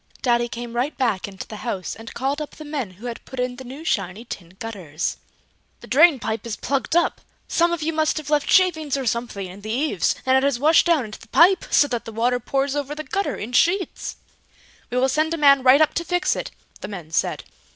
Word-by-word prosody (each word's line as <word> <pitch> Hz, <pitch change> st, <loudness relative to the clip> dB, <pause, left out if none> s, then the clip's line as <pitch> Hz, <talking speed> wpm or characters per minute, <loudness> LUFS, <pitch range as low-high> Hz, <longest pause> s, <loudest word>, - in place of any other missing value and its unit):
Daddy 240 Hz, -1 st, +2 dB
came 240 Hz, -1 st, -7 dB
right 250 Hz, +5 st, -1 dB
back 225 Hz, -8 st, 0 dB
into 195 Hz, -1 st, -9 dB
the 215 Hz, -, -8 dB
house 200 Hz, -5 st, -4 dB
and 225 Hz, +1 st, -11 dB
called 275 Hz, +4 st, -1 dB
up 300 Hz, -, -7 dB
the 310 Hz, -, -10 dB
men 290 Hz, -8 st, -3 dB
who 205 Hz, +7 st, -13 dB
had 235 Hz, -1 st, -6 dB
put 265 Hz, -, -9 dB
in 250 Hz, 0 st, -2 dB
the 260 Hz, -, -8 dB
new 265 Hz, +5 st, -9 dB
shiny 195 Hz, -, -2 dB
tin 180 Hz, -5 st, -9 dB
gutters. 180 Hz, -9 st, -4 dB, 0.6 s
"The -, -, -10 dB
drain 305 Hz, +3 st, +6 dB
pipe 220 Hz, -1 st, -3 dB
is 220 Hz, -, -3 dB
plugged 275 Hz, +7 st, -2 dB
up. 345 Hz, -, +2 dB, 0.3 s
Some 340 Hz, +1 st, +2 dB
of 340 Hz, -3 st, -2 dB
you 325 Hz, +1 st, -1 dB
must 315 Hz, 0 st, +1 dB
have 305 Hz, -1 st, -5 dB
left 295 Hz, -1 st, +2 dB
shavings 315 Hz, -7 st, +3 dB
or 270 Hz, -, -3 dB
something 235 Hz, -4 st, -2 dB
in 185 Hz, +2 st, -10 dB
the 215 Hz, -, -7 dB
eaves, 245 Hz, -, +1 dB
and 260 Hz, 0 st, +4 dB
it 265 Hz, -, +5 dB
has 275 Hz, -2 st, +1 dB
washed 310 Hz, +6 st, +4 dB
down 320 Hz, -7 st, +3 dB
into 215 Hz, -, -9 dB
the -, -, -16 dB
pipe, 370 Hz, +3 st, +5 dB
so 290 Hz, -, +5 dB
that 240 Hz, -4 st, -3 dB
the 225 Hz, -, -7 dB
water 240 Hz, +3 st, +1 dB
pours 270 Hz, +3 st, -1 dB
over 290 Hz, 0 st, -3 dB
the 310 Hz, -, -5 dB
gutter 395 Hz, +4 st, -2 dB
in 225 Hz, +4 st, -6 dB
sheets!" 350 Hz, +6 st, +1 dB, 0.7 s
"We 250 Hz, -, -2 dB
will 260 Hz, +1 st, +3 dB
send 310 Hz, +4 st, +1 dB
a -, -, -6 dB
man 280 Hz, -3 st, +6 dB
right 260 Hz, +3 st, +6 dB
up 310 Hz, -, +4 dB
to 340 Hz, -, -1 dB
fix 355 Hz, +1 st, +1 dB
it!" -, -, -4 dB, 0.3 s
the -, -, -6 dB
men 175 Hz, -6 st, -8 dB
said. -, -, 0 dB
260 Hz, 235 wpm, -23 LUFS, 225-305 Hz, 0.7 s, drain